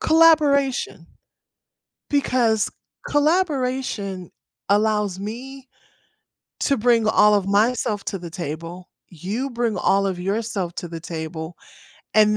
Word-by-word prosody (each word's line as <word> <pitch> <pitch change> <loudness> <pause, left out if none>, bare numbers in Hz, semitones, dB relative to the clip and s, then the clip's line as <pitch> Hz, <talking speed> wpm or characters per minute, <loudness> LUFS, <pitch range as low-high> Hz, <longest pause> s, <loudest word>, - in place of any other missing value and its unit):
collaboration, 290 - +3 1.0
because 245 -6 +1 0.4
collaboration 265 - 0 0.4
allows 210 -2 +1
me 255 +5 -7 0.9
to 275 - +2
bring 230 -1 +3
all 210 -1 +5
of 200 -2 +1
myself 215 +1 +1
to 195 - -3
the 170 -2 -8
table, 170 +1 -6 0.2
you 205 - -4
bring 235 -3 -1
all 195 0 +2
of 185 -2 -2
yourself 195 -2 -2
to 175 - -5
the 165 0 -7
table, 160 0 -6 0.6
and 210 0 +5
210 Hz, 105 wpm, -22 LUFS, 185-255 Hz, 1.0 s, all